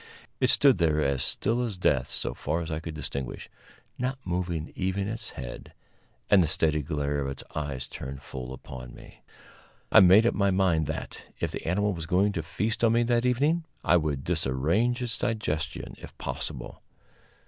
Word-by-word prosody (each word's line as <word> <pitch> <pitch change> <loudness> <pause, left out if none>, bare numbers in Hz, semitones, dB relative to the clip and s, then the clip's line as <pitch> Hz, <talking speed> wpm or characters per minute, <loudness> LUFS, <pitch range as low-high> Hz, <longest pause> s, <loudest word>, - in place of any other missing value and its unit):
It - - +3
stood 135 - +5
there 80 -2 +3
as 70 -3 +1
still 115 +3 +1
as 115 -6 -2
death, 70 -8 +2
so - - -1
far 85 - -2
as 80 0 -5
I 80 - -1
could 80 -1 -7
distinguish, 70 -3 -5 0.5
not 130 +2 -1
moving 85 -3 -2
even 95 +1 -1
its 110 +2 -4
head, - - -8 0.5
and 100 - +6
the 85 - +2
steady 80 -1 +1
glare 75 -1 -1
of 70 - -2
its 70 -1 -5
eyes 70 -4 -3
turned 65 +1 -7
full 65 -2 -7
upon 65 -2 -9
me. - - -14 0.7
I - - +9
made 95 +5 +7
up 120 - +3
my 100 0 +2
mind 90 -5 +2
that, 80 - -5
if - - -1
the - - -6
animal 105 +4 +1
was 85 -2 -6
going 95 +4 +3
to 85 - -2
feast 105 +8 -2
on 115 -1 +5
me 120 +1 +4
that 120 +1 +2
evening, 145 +7 +2 0.2
I - - +5
would 75 -4 -1
disarrange 85 - +1
its 120 - -2
digestion, 85 -9 -2
if - - -12
possible. - - -5
85 Hz, 180 wpm, -28 LUFS, 75-105 Hz, 0.7 s, I